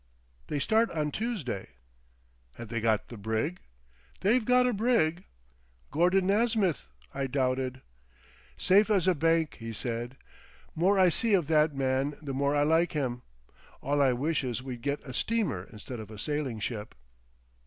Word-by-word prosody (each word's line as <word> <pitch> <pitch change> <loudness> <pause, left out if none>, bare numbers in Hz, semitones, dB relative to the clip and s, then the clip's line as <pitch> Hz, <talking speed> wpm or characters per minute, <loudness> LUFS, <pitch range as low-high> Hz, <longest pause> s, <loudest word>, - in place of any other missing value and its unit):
"They 150 - -2
start 220 +10 +2
on 150 -2 -1
Toosday." 185 - -3 0.9
"Have 115 +6 -9
they 115 -1 -2
got 110 -2 +1
the 120 - -8
brig?" 110 - -2 0.6
"They've 225 +5 +3
got 250 +2 +4
a 250 - +2
brig." 195 -6 +1 0.7
"Gordon 180 +5 +3
Nasmyth!" 205 - +1 0.3
I 135 0 -2
doubted. 130 -1 -1 0.7
"Safe 205 +3 +4
as 190 -4 +2
a 185 - +5
bank," 165 0 +1
he 115 0 -6
said. 120 +3 -4 0.6
"More 190 +5 +2
I 185 -1 +6
see 215 +5 +2
of 175 -5 +1
that 155 -2 +3
man 135 +2 0
the 140 -3 -5
more 140 +2 +1
I 145 - +3
like 165 +4 +2
him. 125 -5 -2 0.6
All 145 +1 0
I 135 -2 +4
wish 145 +4 -1
is 125 0 -3
we'd 125 -3 -6
got 140 +3 -2
a 130 - -8
steamer 195 - -1
instead 110 +3 -8
of 110 -2 -8
a 110 - -10
sailing 140 -1 -2
ship." 110 -1 -5
145 Hz, 160 wpm, -29 LUFS, 125-185 Hz, 0.9 s, I